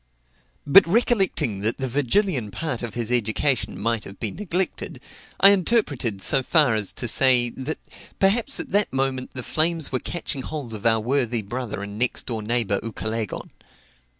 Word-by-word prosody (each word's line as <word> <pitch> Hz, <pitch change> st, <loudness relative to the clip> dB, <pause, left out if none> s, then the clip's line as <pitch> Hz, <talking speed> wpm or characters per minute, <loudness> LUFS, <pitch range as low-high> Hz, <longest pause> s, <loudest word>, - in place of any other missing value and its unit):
But 165 Hz, +6 st, +7 dB
recollecting 195 Hz, -, +1 dB
that 110 Hz, +3 st, 0 dB
the 135 Hz, -, -3 dB
Virgilian 140 Hz, -, 0 dB
part 140 Hz, +3 st, -4 dB
of 120 Hz, -4 st, -6 dB
his 120 Hz, -1 st, -3 dB
education 120 Hz, -2 st, 0 dB
might 115 Hz, +1 st, -1 dB
have 100 Hz, -, -11 dB
been 110 Hz, -4 st, -3 dB
neglected, 185 Hz, -1 st, -3 dB, 0.4 s
I 195 Hz, -, +8 dB
interpreted 150 Hz, -, +1 dB
so 135 Hz, -, +3 dB
far 145 Hz, -2 st, +3 dB
as 105 Hz, -3 st, -2 dB
to 120 Hz, -, -3 dB
say, 120 Hz, 0 st, +4 dB
that 135 Hz, +6 st, -5 dB, 0.4 s
perhaps 225 Hz, +7 st, +2 dB
at 320 Hz, -5 st, -5 dB
that 205 Hz, +1 st, +1 dB
moment 135 Hz, -1 st, -2 dB
the 125 Hz, -, -5 dB
flames 160 Hz, +3 st, 0 dB
were 130 Hz, -, 0 dB
catching 155 Hz, -4 st, -5 dB
hold 140 Hz, -4 st, -6 dB
of 110 Hz, +1 st, -2 dB
our 115 Hz, 0 st, +3 dB
worthy 120 Hz, -1 st, -1 dB
brother 115 Hz, -1 st, -5 dB
and 100 Hz, +1 st, -7 dB
next 125 Hz, 0 st, +1 dB
door 115 Hz, -3 st, -4 dB
neighbor 110 Hz, -2 st, 0 dB
Ucalegon. 110 Hz, -1 st, -4 dB
125 Hz, 165 wpm, -23 LUFS, 110-160 Hz, 0.4 s, I